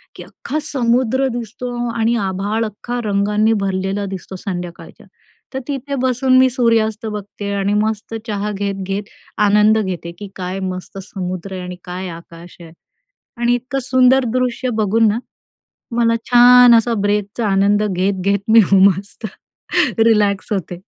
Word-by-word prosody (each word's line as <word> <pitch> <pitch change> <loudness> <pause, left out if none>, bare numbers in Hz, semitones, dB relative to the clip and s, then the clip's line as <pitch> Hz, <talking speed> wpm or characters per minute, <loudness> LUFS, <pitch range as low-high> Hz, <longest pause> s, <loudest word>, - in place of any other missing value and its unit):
की - - -9
अख्खा 305 - -5
समुद्र 260 -2 +1
दिसतो 240 +2 -6 0.2
आणि 230 +1 +1
आभाळ 205 +4 -2
अख्खा 240 +3 -5
रंगांनी 210 +2 +1
भरलेलं 195 +1 -2
दिसतो 190 0 -7
संध्याकाळच्या. 180 -3 -7 0.5
तर 265 - -2
तिथे 280 0 -4
बसून 255 0 +2
मी 260 0 +5
सूर्यास्त 230 -3 +1
बघते 205 -1 -6
आणि 200 +1 0
मस्त 220 +1 -3
चहा 210 -1 -2
घेत-घेत 195 0 -3 0.4
आनंद 210 +2 +4
घेते 180 -4 -4
की 205 -1 -8
काय 185 +1 -4
मस्त 185 +1 -8
समुद्र 185 -1 -6
आहे 185 - -5
आणि 180 0 -6
काय 180 +1 -5
आकाश 170 +1 -12
आहे. 165 -1 -12 0.7
आणि 240 0 +3
इतकं 255 +3 -3
सुंदर 260 +1 +4
दृश्य 255 0 -1
बघून 220 +2 +3
ना, 210 +2 0 0.8
मला 230 -1 +3 0.2
छान 245 0 +8
असा 230 +1 +2
ब्रेकचा 205 +2 -1
आनंद 200 +2 +2
घेत, 190 +1 0
घेत 200 +1 +2
मी 230 - +8
हो 195 - +6
मस्त 195 +4 -6 0.7
रिलॅक्स 210 -3 +2
होते. 180 -3 -4
210 Hz, 145 wpm, -18 LUFS, 195-240 Hz, 0.8 s, छान